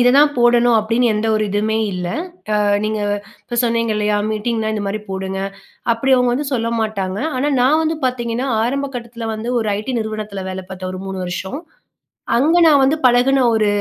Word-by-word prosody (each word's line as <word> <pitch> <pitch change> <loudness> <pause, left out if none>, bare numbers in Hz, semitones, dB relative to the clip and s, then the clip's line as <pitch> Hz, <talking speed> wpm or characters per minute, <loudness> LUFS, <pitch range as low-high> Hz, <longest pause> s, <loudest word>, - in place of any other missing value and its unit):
இத 245 - +5
தான் 290 +1 +5
போடணும் 240 0 +4
அப்டின்னு 230 +2 +1
எந்த 215 +1 -1
ஒரு 215 - 0
இதுவுமே 215 +2 0
இல்ல. 180 -1 -3 0.5
அ - - +3 0.2
நீங்க 215 0 -2 0.4
இப்போ 240 - -5
சொன்னீங்க 230 -1 +1
இல்லையா, 210 0 +1
மீட்டிங்னா 220 0 -1
இந்த 210 -1 -2
மாரி 205 +2 -2
போடுங்க. 190 0 -3 0.5
அப்டி 265 +4 +1
அவங்க 250 -1 +2
வந்து 285 +3 -2
சொல்ல 230 -2 0
மாட்டாங்க. 200 -3 -2 0.2
ஆனா, 280 +3 +1
நான் 295 +6 +4
வந்து 320 0 -1
பார்த்தீங்கன்னா, 245 0 -1 0.2
ஆரம்ப 275 +3 -1
கட்டத்துல 235 -1 -6
வந்து 220 +2 -5
ஒரு 220 - -1
ஐடி 215 +5 -4
நிறுவனத்துல 215 -3 -5
வேல 190 0 -5
பார்த்தேன், 185 0 -5
ஒரு 185 - -6
3 190 -1 -4
வருஷம். 190 - -4 0.8
அங்க 315 +7 +3
நான் 295 -3 +6
வந்து 270 +4 +3
பழகுன 255 +2 +4
ஒரு 220 -1 +2
230 Hz, 185 wpm, -19 LUFS, 210-250 Hz, 0.8 s, நான்